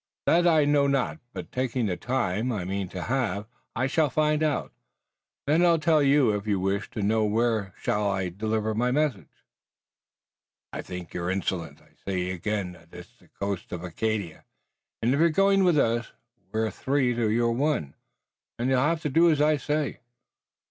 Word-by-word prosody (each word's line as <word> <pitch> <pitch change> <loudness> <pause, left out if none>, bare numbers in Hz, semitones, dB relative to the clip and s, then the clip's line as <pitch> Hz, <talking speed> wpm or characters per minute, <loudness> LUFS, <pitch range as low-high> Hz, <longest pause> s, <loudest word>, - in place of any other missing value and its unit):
"That 175 +1 +4
I 155 -3 +4
know 145 -1 +3
not, 140 +3 0
but - - -8
taking 125 -2 -1
the 95 -4 -1
time, 120 0 -1
I 100 -6 -3
mean 95 0 -3
to 90 -2 -5
have, 115 -6 -1 0.3
I 130 - 0
shall 150 +2 +2
find 150 +2 +1
out. 155 -2 -1 0.7
Then 155 +5 +3
I'll 170 -1 +5
tell 155 -1 +3
you 140 -4 +4
if 105 0 -3
you 100 -2 +1
wish 95 +2 -1
to 105 - -4
know. 110 +2 +2
Where 110 -2 0
shall 105 -1 0
I 95 -2 -1
deliver 110 +3 -2
my 120 +3 +1
message?" 130 - 0 1.4
"I - - -4
think 90 -2 -8
you're 85 0 -3
insolent. 90 -5 -3
I - - -25
say 90 -2 -2
again 95 +1 -2
that 85 -2 -17
it's - - -13
the - - -23
coast 100 -2 -5
of 90 -1 -5
Acadia, 100 -1 -3 0.6
and 120 - +3
you're 160 +5 +4
going 195 +3 +3
with 175 -4 +4
us. 115 -3 +1 0.4
We're 110 0 0
three 130 +2 0
to 115 -2 0
your 115 +2 +2
one, 125 - 0 0.6
and 125 +3 0
you'll 130 - +3
have 160 +4 +1
to 150 - 0
do 170 +4 +5
as 155 -3 +2
I 150 +1 +3
say." 150 +1 -2
115 Hz, 180 wpm, -26 LUFS, 100-145 Hz, 1.4 s, I'll